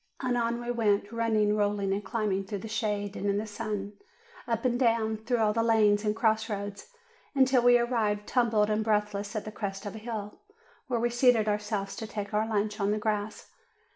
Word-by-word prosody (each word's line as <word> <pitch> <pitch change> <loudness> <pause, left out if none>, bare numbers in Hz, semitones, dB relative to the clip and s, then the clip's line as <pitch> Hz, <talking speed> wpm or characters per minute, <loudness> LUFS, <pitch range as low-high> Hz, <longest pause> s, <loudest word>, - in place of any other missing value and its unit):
And 250 -2 0
on 235 0 0
we 240 0 -3
went, 210 -3 +1
running, 220 -2 +1
rolling, 205 -2 0
and 200 +1 -2
climbing 200 -3 -1
through 205 +1 -4
the - - -4
shade 210 -2 -2
and 205 - -3
in 200 0 +1
the 210 - -2
sun, 210 -2 -4 0.5
up 230 0 -1
and 245 -1 +1
down, 225 -3 +2
through 240 +3 -1
all 215 -2 +2
the 230 - +1
lanes 215 -2 +3
and 210 0 0
cross 220 0 +1
roads, 200 - -5 0.5
until 260 -2 +4
we 245 0 +6
arrived 220 -4 0
tumbled 220 -4 +2
and 215 +1 +1
breath 210 -1 +1
less 200 +2 -5
at 215 - -3
the 215 - -6
crest 200 -1 -5
of 205 - -5
a 220 - -7
hill, 215 -2 -6 0.5
where 245 -3 0
we 240 +1 +1
seated 240 -3 +4
ourselves 210 -1 -2
to 220 - -5
take 205 -1 -5
our 215 +1 +1
lunch 210 0 -1
on 200 0 +1
the 210 - +1
grass. 210 0 -3
215 Hz, 210 wpm, -29 LUFS, 205-230 Hz, 0.5 s, we